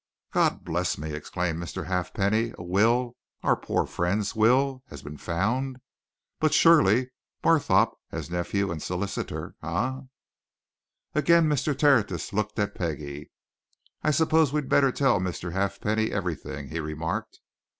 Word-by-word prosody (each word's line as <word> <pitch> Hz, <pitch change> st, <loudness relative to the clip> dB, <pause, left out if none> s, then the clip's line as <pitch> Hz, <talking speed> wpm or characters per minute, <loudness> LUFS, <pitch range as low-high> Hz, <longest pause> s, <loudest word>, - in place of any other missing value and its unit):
"God -, -, +1 dB
bless -, -, -1 dB
me!" 75 Hz, +1 st, -5 dB
exclaimed 85 Hz, +2 st, -3 dB
Mr. 85 Hz, +1 st, -5 dB
Halfpenny. 100 Hz, +6 st, 0 dB
"A -, -, -7 dB
will 115 Hz, +7 st, +2 dB, 0.3 s
our -, -, +3 dB
poor -, -, -1 dB
friend's 95 Hz, +5 st, -1 dB
will 130 Hz, +4 st, +3 dB
has 70 Hz, -2 st, -10 dB
been 75 Hz, +1 st, -8 dB
found! 120 Hz, +10 st, -1 dB, 0.6 s
But 155 Hz, -1 st, +2 dB
surely, 130 Hz, -, +5 dB, 0.3 s
Barthorpe, -, -, +4 dB, 0.2 s
as -, -, -5 dB
nephew, 95 Hz, +3 st, -1 dB
and 80 Hz, -2 st, -5 dB
solicitor 90 Hz, +4 st, -4 dB
eh?" 125 Hz, +11 st, -2 dB, 1.1 s
Again 165 Hz, +2 st, +4 dB
Mr. 145 Hz, -1 st, 0 dB
Tertius 115 Hz, -, +2 dB
looked 105 Hz, +1 st, -2 dB
at 105 Hz, 0 st, 0 dB
Peggie. 75 Hz, -4 st, -5 dB, 0.7 s
"I -, -, +1 dB
suppose 160 Hz, -1 st, +3 dB
we'd 150 Hz, -2 st, -2 dB
better 135 Hz, -2 st, +4 dB
tell 135 Hz, -6 st, +2 dB
Mr. 90 Hz, -1 st, -3 dB
Halfpenny 105 Hz, +4 st, 0 dB
everything," 85 Hz, -6 st, -4 dB
he 80 Hz, -, -4 dB
remarked. 80 Hz, +8 st, -4 dB
100 Hz, 130 wpm, -26 LUFS, 85-130 Hz, 1.1 s, surely